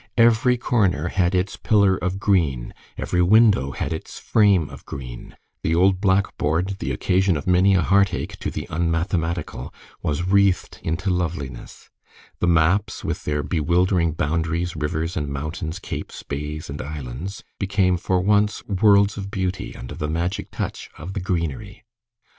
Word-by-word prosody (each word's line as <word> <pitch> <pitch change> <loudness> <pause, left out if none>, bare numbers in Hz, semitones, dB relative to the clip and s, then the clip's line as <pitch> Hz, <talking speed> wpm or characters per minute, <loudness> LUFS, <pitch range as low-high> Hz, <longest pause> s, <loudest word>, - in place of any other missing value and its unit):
Every 120 +1 +4
corner 95 - +1
had 90 0 +1
its 90 +2 -1
pillar 100 -3 +3
of 90 +2 -2
green, 80 - +1 0.2
every 90 - 0
window 100 - +5
had 70 - -3
its 80 - -7
frame 100 -8 +3
of - - -11
green, 60 -3 -8 0.2
the 80 - +1
old 95 +2 +3
blackboard, 95 -2 +1
the 65 - -2
occasion 90 +6 +2
of 70 - -6
many 95 +2 +4
a 90 - +3
heartache 100 +2 +1
to - - -2
the - - -5
unmathematical, 85 -3 -1 0.3
was 75 +3 -1
wreathed 100 0 +2
into 90 +4 -1
loveliness; 80 -8 -4 0.5
the - - +1
maps, 85 +4 +2
with - - -3
their 75 -1 -1
bewildering 85 +3 +1
boundaries, 85 +3 -1
rivers 80 +3 -2
and 75 -5 -2
mountains, 80 +4 -4
capes, - - -7
bays 75 +2 -5
and 70 +1 -5
islands, 75 +6 -6 0.2
became 95 -2 +2
for 90 +1 0
once 105 +2 +2
worlds 100 0 +4
of 100 -1 -5
beauty 95 -3 -3
under - - -8
the 75 - -3
magic 90 +5 -2
touch - - -5
of 85 +5 -7
the 100 - -2
greenery. 95 +3 -3
90 Hz, 150 wpm, -23 LUFS, 80-100 Hz, 0.5 s, window